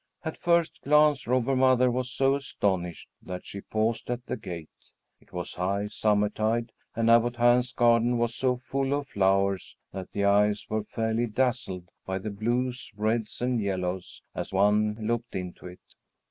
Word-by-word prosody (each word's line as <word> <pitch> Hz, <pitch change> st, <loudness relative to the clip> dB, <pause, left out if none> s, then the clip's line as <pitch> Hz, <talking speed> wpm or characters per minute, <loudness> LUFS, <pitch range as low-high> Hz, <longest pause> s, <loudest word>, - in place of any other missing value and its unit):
At 160 Hz, -, -4 dB
first 170 Hz, -1 st, +2 dB
glance 150 Hz, -2 st, +4 dB
Robber 130 Hz, +2 st, +2 dB
Mother 130 Hz, -1 st, +4 dB
was 125 Hz, +1 st, -2 dB
so 135 Hz, +1 st, +2 dB
astonished 95 Hz, -10 st, -2 dB
that 90 Hz, -1 st, -7 dB
she 100 Hz, -, -7 dB
paused 110 Hz, +3 st, -1 dB
at 120 Hz, 0 st, -3 dB
the -, -, -3 dB
gate. 85 Hz, -3 st, -8 dB, 0.5 s
It -, -, -26 dB
was 90 Hz, -1 st, -5 dB
high 100 Hz, +3 st, -1 dB
summertide, 110 Hz, +2 st, +1 dB, 0.2 s
and 115 Hz, 0 st, +1 dB
Abbot 120 Hz, +1 st, +5 dB
Hans' 120 Hz, +1 st, +3 dB
garden 120 Hz, 0 st, +3 dB
was 120 Hz, 0 st, 0 dB
so 125 Hz, +1 st, +1 dB
full 135 Hz, +2 st, -2 dB
of 145 Hz, -1 st, -4 dB
flowers 95 Hz, -1 st, +1 dB, 0.2 s
that 95 Hz, -1 st, -7 dB
the 100 Hz, -, 0 dB
eyes 105 Hz, +1 st, +3 dB
were 110 Hz, -1 st, -1 dB
fairly 115 Hz, +1 st, -1 dB
dazzled 110 Hz, -7 st, -1 dB
by 95 Hz, 0 st, -3 dB
the 105 Hz, +3 st, -5 dB
blues, 120 Hz, +5 st, -2 dB
reds, 110 Hz, +2 st, -1 dB
and 125 Hz, -2 st, +1 dB
yellows, 95 Hz, -2 st, -3 dB
as -, -, -5 dB
one 105 Hz, +2 st, +3 dB
looked 115 Hz, +2 st, -2 dB
into 90 Hz, -1 st, -6 dB
it. 90 Hz, 0 st, -11 dB
115 Hz, 160 wpm, -27 LUFS, 100-125 Hz, 0.5 s, Abbot